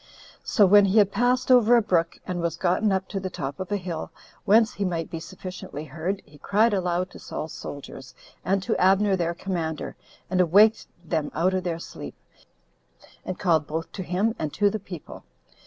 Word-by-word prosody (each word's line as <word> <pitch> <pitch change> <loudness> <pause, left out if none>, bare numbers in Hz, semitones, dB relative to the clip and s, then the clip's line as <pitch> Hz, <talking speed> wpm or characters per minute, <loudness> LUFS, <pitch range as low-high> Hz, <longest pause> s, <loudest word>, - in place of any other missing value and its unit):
So 210 - +4
when 205 +1 +7
he 195 +3 +2
had 200 -2 +5
passed 250 +3 +1
over 245 -1 +6
a - - +4
brook, 170 -4 0
and 180 -1 -3
was 170 -1 -2
gotten 190 +4 +1
up 190 0 0
to 195 - -3
the 190 0 -4
top 145 -2 -5
of 185 +1 -5
a 205 - +1
hill, 175 -4 -5 0.4
whence 225 +3 +4
he 205 - -3
might 170 -4 -2
be 165 - -4
sufficiently 180 -4 -8
heard, 165 +7 -4
he 145 0 -18
cried 215 +6 +2
aloud 180 -1 -1
to - - -12
Saul's 155 - -6
soldiers, 135 -2 -9 0.3
and 195 0 0
to 220 - 0
Abner 195 +2 +4
their 170 -2 -1
commander, 165 -5 -4 0.3
and 185 0 +2
awaked 205 +6 +5 0.2
them 155 -3 -1
out 180 +4 +2
of 185 -1 -1
their 170 -2 -2
sleep, 170 - -9 1.1
and 185 - -5
called 160 -6 +2
both 160 +1 -4
to 195 - -6
him 190 +5 0
and 155 -2 -2
to 205 0 +2
the 215 - -3
people. 180 -5 -10
185 Hz, 195 wpm, -25 LUFS, 165-205 Hz, 1.1 s, when